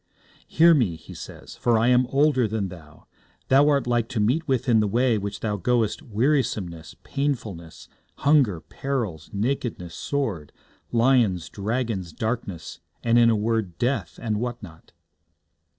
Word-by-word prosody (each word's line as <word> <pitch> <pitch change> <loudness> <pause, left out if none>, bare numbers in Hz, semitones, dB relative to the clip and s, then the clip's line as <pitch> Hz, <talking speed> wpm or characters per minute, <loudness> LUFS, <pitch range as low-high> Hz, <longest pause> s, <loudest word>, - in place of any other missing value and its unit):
'Hear 165 +1 +6
me,' 115 - +2
he 80 - -12
says, - - -10
'for 120 -2 +2
I 115 +2 +3
am 125 0 +4
older 135 -3 +3
than 105 -2 -2
thou. 80 -4 -14 0.4
Thou 140 +3 +5
art 140 -2 +2
like 120 -2 0
to 125 - -2
meet 130 +11 +1
with 130 -2 0
in 115 -3 +5
the 105 - +2
way 120 +3 +2
which 100 0 -5
thou 105 -2 -1
goest 115 +2 0
wearisomeness, 105 - -1
painfulness, 110 - -4 0.3
hunger, 135 - +3
perils, 115 - -4
nakedness, 105 -5 -2
sword, 110 - -3 0.4
lions, 115 -8 +2
dragons, 105 -4 -3
darkness, 110 -7 -4 0.2
and 120 0 +4
in 115 -1 +6
a 115 - +3
word, 105 -5 -1
death, 130 +7 -1
and 110 -3 -2
what 120 0 -4
not.' 80 -4 -13
115 Hz, 150 wpm, -24 LUFS, 100-130 Hz, 0.4 s, Hear